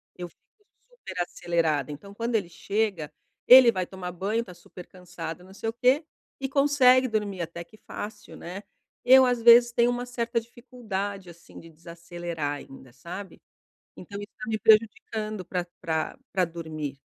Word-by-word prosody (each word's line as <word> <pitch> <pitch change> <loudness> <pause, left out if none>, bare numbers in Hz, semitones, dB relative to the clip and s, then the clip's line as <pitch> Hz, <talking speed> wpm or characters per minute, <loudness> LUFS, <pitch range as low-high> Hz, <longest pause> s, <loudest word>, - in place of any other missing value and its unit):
Eu 180 -1 -6
fico 415 - -37 0.2
super 475 - -6
acelerada. 165 -5 -1
Então, 200 +8 -10
quando 230 +3 -2
ele 195 -6 0
chega, 200 -5 -2 0.4
ele 250 -2 +10
vai 185 -3 -2
tomar 180 -1 -7
banho, 205 +6 -2
tá 180 - -12
super 175 +1 -13
cansado, 180 -2 -8
não 190 +1 -15
sei 225 - -4
o - - -5
quê, 255 +6 +2 0.3
e 270 -1 -3
consegue 270 -2 +4
dormir 210 -5 -2
até 170 +1 -6
que 215 +6 -20
fácil, 210 +1 -9
né? 185 +4 -8 0.4
Eu, 260 +1 +7
às 245 -2 0
vezes 235 +1 +7
tenho 235 +1 +3
uma 245 0 -2
certa 235 -1 -2
dificuldade, 210 -5 -6
assim, 170 0 -14
de 165 - -14
desacelerar 170 -2 -6
ainda, 135 -2 -13
sabe? 180 +10 -9 0.6
Então 200 -1 -9
isso 205 - -10
tá 250 0 -7
me 220 -1 -1
prejudicando 215 -2 +2
pra 180 0 -3 0.2
pra 160 +9 -2
pra 185 -1 +2
dormir. 155 -4 -6
200 Hz, 165 wpm, -26 LUFS, 170-235 Hz, 0.6 s, ele